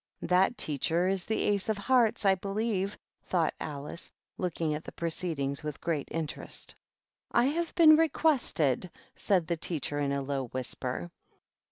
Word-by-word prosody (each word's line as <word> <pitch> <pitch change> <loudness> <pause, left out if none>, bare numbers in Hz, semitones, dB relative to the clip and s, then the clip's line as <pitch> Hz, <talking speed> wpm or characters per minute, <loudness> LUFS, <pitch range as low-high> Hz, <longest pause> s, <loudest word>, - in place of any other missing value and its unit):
" - - -46
That 190 +6 +4
teacher 165 0 +1
is 190 -1 0
the 220 - 0
Ace 205 0 +1
of 215 - +1
Hearts, 230 -1 +2
I 195 - +6
believe," 200 +1 -1 0.2
thought 170 -4 0
Alice, 145 +2 -5 0.3
looking 165 -3 -1
at 150 +2 -4
the - - -8
proceedings 160 -4 -2
with 150 -2 -5
great 160 -4 -2
interest. 160 -2 -5 0.3
" - - -65 0.2
I 240 - +4
have 330 +5 -1
been 320 -3 +8
requested 260 - +2
" - - -31
said 185 -5 +3
the 170 0 -1
teacher, 150 -3 -2
in 140 -1 0
a 140 0 -1
low 135 -1 -2
whisper. 125 -6 -4
175 Hz, 165 wpm, -30 LUFS, 145-210 Hz, 0.3 s, been